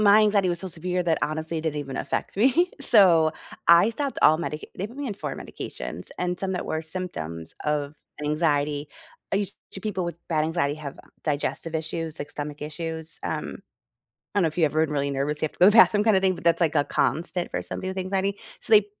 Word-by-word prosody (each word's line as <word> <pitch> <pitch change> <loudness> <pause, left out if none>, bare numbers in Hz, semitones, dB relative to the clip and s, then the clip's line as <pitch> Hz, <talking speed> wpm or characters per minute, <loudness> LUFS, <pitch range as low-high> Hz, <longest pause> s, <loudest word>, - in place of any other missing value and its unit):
My 210 0 +7
anxiety 205 -3 +3
was 175 -1 0
so 190 - -3
severe 180 +2 -1
that 165 -2 +1
honestly, 160 +2 -2
it - - -5
didn't 155 -2 -2
even 135 -2 -6
affect - - -3
me 270 - +4
so, 180 - +6 0.3
I 170 +6 +7
stopped 275 +4 -2
all 155 +1 +6
medic 155 -2 -4
they 195 - -2
put 235 +4 -14
me 285 0 -4
on 215 - -3
4 - - -5
medications - - -6
and 180 0 -1
some 190 -1 +1
that 180 - -3
were 160 - -2
symptoms 85 - -4
of 150 0 -1 0.2
an 150 - -4
anxiety. 150 -1 0 0.4
I - - +3
used 200 -1 -2 0.2
to 195 - -7
people 190 -3 -2
with 170 -1 -4
bad 155 -2 +1
anxiety 160 -3 0
have 150 -3 -8 0.2
digestive 155 +2 -1
issues, 160 0 -3
like 145 - -5
stomach 145 0 -5
issues, 160 +1 -2
um - - -4 0.8
I - - +2
don't 190 - +3
know - - +4
if 155 - -8
you 165 - +4
ever 155 +1 +1
been 150 - -6
really 140 -1 0
nervous, 140 +2 -2
you - - +3
have - - -8
to - - -24
go 180 - +7
to - - +8
the - - +3
bathroom 210 -2 +6
kind 220 -3 +4
of 190 - +2
thing, 190 -1 +2
but - - -11
that's, 170 0 +3
like, 165 -3 +2
a 145 - +3
constant 175 +4 0
for - - -3
somebody 185 - -4
with 190 0 -4
anxiety. 195 +1 -1 0.2
So, - - -1
they 210 -1 +7
165 Hz, 235 wpm, -25 LUFS, 150-190 Hz, 0.8 s, to